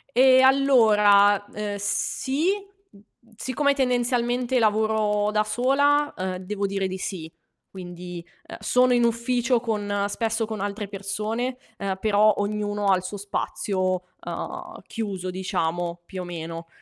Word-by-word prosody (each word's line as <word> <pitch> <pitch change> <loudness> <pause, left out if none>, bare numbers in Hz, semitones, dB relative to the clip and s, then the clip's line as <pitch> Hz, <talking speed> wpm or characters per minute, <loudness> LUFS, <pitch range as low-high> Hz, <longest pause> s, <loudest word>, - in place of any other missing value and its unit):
E 260 0 +7
allora, 210 -7 +5
ehm, 205 -1 -4
sì, 265 - -1 0.4
mhmm, 200 - -19 0.2
mhmm, 230 - -25
siccome 280 +4 +1
tendenzialmente 245 -1 +1
lavoro 215 -1 +2
da 215 0 +1
sola, 285 +6 +2
ehm, 185 0 -3
devo 200 +2 -3
dire 195 -1 -1
di 185 0 -5
sì. 175 -4 -5 0.4
Quindi, 175 -2 -8 0.2
ehm, - - -9
sono 250 0 +3
in 240 -1 +4
ufficio 235 +1 +1
con 205 -3 -1
spesso 225 +1 -1
con 220 -1 -5
altre 205 +1 -4
persone, 215 +5 -3 0.2
ehm, 195 -2 -3
però 215 0 +4
ognuno 205 0 -1
ha 190 -1 +5
il 180 - -6
suo 185 +3 -6
spazio, 185 -2 -2 0.2
ehm, - - -6
chiuso 195 -5 -4
diciamo, 175 -2 -2
più 185 0 -6
o - - -5
meno. 165 -1 -6
210 Hz, 140 wpm, -24 LUFS, 195-240 Hz, 0.4 s, E